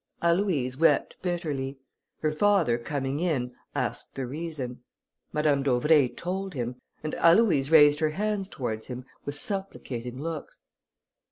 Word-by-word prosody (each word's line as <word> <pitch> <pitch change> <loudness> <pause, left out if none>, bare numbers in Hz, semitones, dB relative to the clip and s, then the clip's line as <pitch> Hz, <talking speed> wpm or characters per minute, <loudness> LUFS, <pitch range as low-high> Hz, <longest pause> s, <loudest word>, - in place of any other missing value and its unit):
Aloïse 170 -8 +1
wept 160 -3 +3
bitterly. 150 -7 -2 0.4
Her 155 - +1
father 165 -8 +3
coming 135 +2 -2
in, 140 -8 0 0.2
asked - - -3
the 135 - -3
reason. 135 -3 -5 0.5
Madame 150 -2 +2
d'Auvray 140 +2 +4
told 190 +3 -4
him, 125 -1 -3 0.3
and 155 - -3
Aloïse 165 -6 +5
raised 150 -2 +7
her 155 -1 +2
hands 200 +3 -2
towards 110 - -4
him 125 0 -6 0.2
with 145 0 -4
supplicating 130 - -2
looks. 160 0 -6
150 Hz, 125 wpm, -27 LUFS, 130-170 Hz, 0.5 s, raised